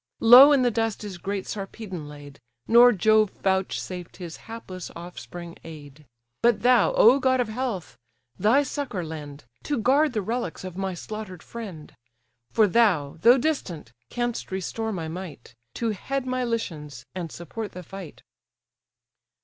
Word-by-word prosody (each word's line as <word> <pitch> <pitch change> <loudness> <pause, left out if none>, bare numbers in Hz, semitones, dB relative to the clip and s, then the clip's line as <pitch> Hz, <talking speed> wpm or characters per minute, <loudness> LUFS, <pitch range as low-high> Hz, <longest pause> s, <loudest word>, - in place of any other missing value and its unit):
Low 250 +5 +9
in 275 -3 +4
the 245 - +3
dust 225 -1 -1
is 195 -4 -7
great 195 +1 -3
Sarpedon 195 -5 -6
laid, 145 -1 -12 0.3
Nor 240 +2 +8
Jove 215 0 +3
vouchsafed 190 -2 -2
his 175 -3 -8
hapless 185 -6 -7
offspring 175 0 -9
aid; 150 -2 -12 0.3
But 230 -3 +3
thou, 250 -1 +4
O 245 +5 +6
god 260 -1 +2
of 240 -3 0
health! 215 - -4 0.4
thy 225 - +3
succour 275 - -4
lend, 150 -4 -8 0.2
To 290 - -1
guard 270 +5 +3
the 215 -3 -1
relics 225 -5 -3
of 185 -2 -7
my 190 -1 -3
slaughter'd 195 -2 -8
friend: 195 -10 -9 0.6
For 220 - +4
thou, 180 -10 +2
though 240 +3 +7
distant, 190 - -3 0.2
canst 240 -4 -3
restore 220 +4 -3
my 170 -6 -4
might, 160 -7 -8 0.2
To 230 -2 -1
head 270 +6 -3
my 255 0 -1
Lycians, 155 - -4
and 175 -4 -5
support 205 +5 -7
the 180 - -8
fight." 190 -2 -10
200 Hz, 150 wpm, -25 LUFS, 170-235 Hz, 0.6 s, Low